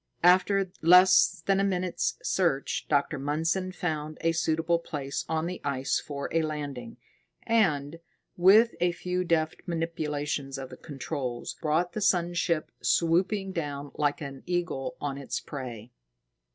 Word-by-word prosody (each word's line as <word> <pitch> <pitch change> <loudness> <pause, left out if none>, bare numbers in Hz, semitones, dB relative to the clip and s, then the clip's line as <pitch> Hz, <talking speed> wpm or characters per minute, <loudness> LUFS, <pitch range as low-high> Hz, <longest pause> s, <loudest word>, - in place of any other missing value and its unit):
After 185 +1 +4
less 180 -1 +6
than 195 0 +3
a - - +2
minute's 185 -2 -1
search, 165 -8 0
Dr. 145 0 +1
Mundson 160 +6 -1
found 155 -4 -3
a 165 - +2
suitable 165 +1 +1
place 140 -4 -4
on 160 0 0
the 180 +1 -5
ice 135 -1 0
for 140 -2 -5
a 165 - +2
landing, 145 -7 -5 0.5
and, 165 -9 +1 0.4
with 210 +6 +6
a 175 0 +2
few 180 +1 -2
deft 160 -2 0
manipulations 150 -4 -2
of 135 -1 -7
the - - -9
controls, 135 -4 -5
brought 165 +3 +1
the 215 - -3
sun 175 -3 +2
ship 170 -2 0
swooping 190 +4 +1
down 145 -5 -4
like 145 +2 0
an 140 -2 -7
eagle 175 -7 -2
on 140 -1 -3
its 140 - -3
prey. 125 -5 -8
160 Hz, 140 wpm, -28 LUFS, 145-180 Hz, 0.5 s, less